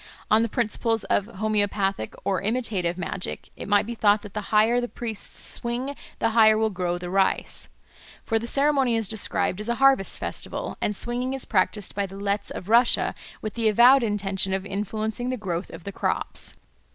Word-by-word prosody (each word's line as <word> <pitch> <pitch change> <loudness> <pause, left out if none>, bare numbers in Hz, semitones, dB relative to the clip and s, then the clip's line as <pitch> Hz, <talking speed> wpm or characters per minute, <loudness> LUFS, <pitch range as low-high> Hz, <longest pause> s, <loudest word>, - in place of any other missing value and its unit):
On 215 +1 +6
the 230 - 0
principles 225 -1 0
of 195 +1 0
homoeopathic 205 - -1
or 190 -3 0
imitative 200 -6 -1
magic 180 +1 -5
it - - -8
might 205 0 +3
be 235 - -4
thought 210 -2 +3
that 205 -2 -10
the 210 - -3
higher 225 +3 +4
the 245 - -2
priests 225 -3 -6
swing 245 +4 -3 0.2
the 225 - +1
higher 220 -1 +6
will 220 0 +1
grow 180 -2 -2
the 175 0 -6
rice. 195 0 0 0.5
For 225 -1 0
the 235 - -6
ceremony 275 -3 +2
is 225 -2 0
described 205 -3 -1
as 210 +2 -4
a 235 - +1
harvest 270 -6 +3
festival, - - -4
and 210 - 0
swinging 245 +4 +1
is 270 - -2
practised 190 0 0
by 200 -1 -1
the 195 +1 -10
Letts 200 0 -1
of 180 - -7
Russia 235 +3 +4 0.3
with 215 - -3
the 230 -2 +2
avowed 245 +5 +7
intention 195 -3 0
of 190 0 -4
influencing 215 +4 -3
the 255 - -2
growth 180 -4 -4
of - - -10
the 200 - -5
crops. - - -2
215 Hz, 190 wpm, -25 LUFS, 195-235 Hz, 0.5 s, avowed